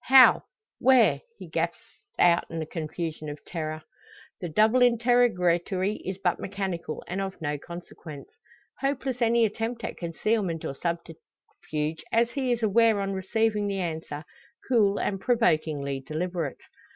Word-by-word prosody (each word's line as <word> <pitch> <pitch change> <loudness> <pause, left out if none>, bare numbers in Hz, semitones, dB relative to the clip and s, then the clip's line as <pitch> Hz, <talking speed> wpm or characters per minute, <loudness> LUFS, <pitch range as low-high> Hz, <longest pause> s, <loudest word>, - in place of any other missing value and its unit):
"How 265 -1 +7 0.3
where?" 255 -2 +5 0.2
he - - -9
gasps - - -3 0.2
out 175 -1 +4
in 165 - -5
the 160 - -2
confusion 155 -1 -5
of 145 0 -9
terror. 155 -2 -4 0.6
The 175 - -4
double 215 +9 +4
interrogatory 215 -6 +3
is 190 0 -5
but 185 -2 0
mechanical, 190 -5 -4
and 190 +2 -3
of 195 -1 -5
no 145 -2 -2
consequence. 165 -3 -9 0.5
Hopeless 270 -2 -1
any 235 0 +4
attempt 225 +2 -3
at - - -4
concealment 175 0 -1
or - - -3
subterfuge; 160 -1 -5
as 235 +1 +3
he 260 -1 -1
is 240 -1 0
aware 220 0 +4
on 195 0 -1
receiving 210 +2 0
the 195 -1 -2
answer, 160 -4 -4 0.4
cool 210 -6 +3
and 195 -2 -1
provokingly 155 - +1
deliberate. 155 +2 -3
190 Hz, 140 wpm, -27 LUFS, 160-225 Hz, 0.6 s, How